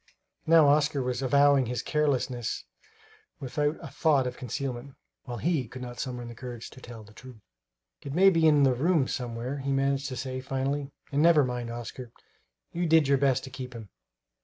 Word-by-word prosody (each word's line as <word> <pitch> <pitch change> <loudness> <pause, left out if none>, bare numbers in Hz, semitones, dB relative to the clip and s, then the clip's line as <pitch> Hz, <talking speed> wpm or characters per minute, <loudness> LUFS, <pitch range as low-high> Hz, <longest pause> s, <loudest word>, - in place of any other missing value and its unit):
Now 160 -2 +6
Oscar 145 -1 +2
was 125 0 -2
avowing 140 0 +4
his 125 0 -3
carelessness 130 -6 -1 0.7
without 145 +3 -1
a - - -6
thought 145 -5 +2
of 125 0 -4
concealment, 130 +1 -5 0.3
while 120 -2 -5
he 150 -2 0
could 125 +3 -9
not 120 -1 -8
summon 120 -3 -5
courage 120 -1 -8
to 130 - -14
tell 120 -3 -10
the 105 +1 -17
truth. 125 -1 -13 0.6
"It 140 +1 -6
may 195 +2 +6
be 165 -2 +3
in 150 -2 +5
the 135 -2 +4
rooms 150 +2 +1
somewhere," 125 +2 -4
he 140 +1 -3
managed 135 0 0
to 130 - -5
say 130 -1 -4
finally; 135 +2 -2 0.2
"and 145 +1 +1
never 165 -2 +6
mind, 125 -1 -4
Oscar, 120 +1 -7 0.6
you 175 0 -1
did 160 -2 +4
your 140 -1 +3
best 135 -2 +2
to 130 - -9
keep 125 0 -7
him." 110 -3 -9
135 Hz, 185 wpm, -28 LUFS, 125-145 Hz, 0.7 s, Now